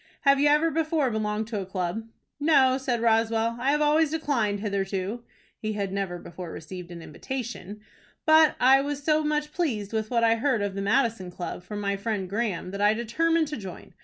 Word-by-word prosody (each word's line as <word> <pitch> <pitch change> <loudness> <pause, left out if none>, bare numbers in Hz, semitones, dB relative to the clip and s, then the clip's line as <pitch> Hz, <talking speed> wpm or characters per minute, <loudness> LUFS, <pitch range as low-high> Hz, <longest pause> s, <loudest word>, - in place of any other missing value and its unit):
Have 275 -1 +4
you 290 - +4
ever 300 +3 +4
before 310 -4 +1
belonged 215 0 -1
to 210 -4 -2
a - - -5
club?" 190 +4 -3 0.3
"No," 270 -4 +4
said 245 -3 -1
Roswell. 225 0 +2
"I 260 +3 +1
have 295 +1 +2
always 300 +1 +3
declined 260 -10 0
hitherto 200 +2 -2 0.4
(he 215 0 -3
had 200 -2 -3
never 195 -3 -2
before 175 0 -8
received 180 +2 -8
an 170 -2 -9
invitation) 235 - -6 0.4
but 315 -1 +6
I 265 +2 +6
was 285 0 -4
so 310 +1 +2
much 300 0 -1
pleased 230 - -2
with 220 -1 -1
what 235 -2 +1
I 230 0 +4
heard 235 -3 +1
of 200 -1 -2
the 195 - -4
Madison 225 -3 +1
Club 180 0 -6
from 205 +3 -7
my 200 -1 -1
friend 200 -2 -2
Graham, 200 -3 -2
that 200 +1 -5
I 210 +1 +4
determined 320 +8 +1
to 300 - -4
join. 190 -5 -9
225 Hz, 195 wpm, -26 LUFS, 200-285 Hz, 0.4 s, but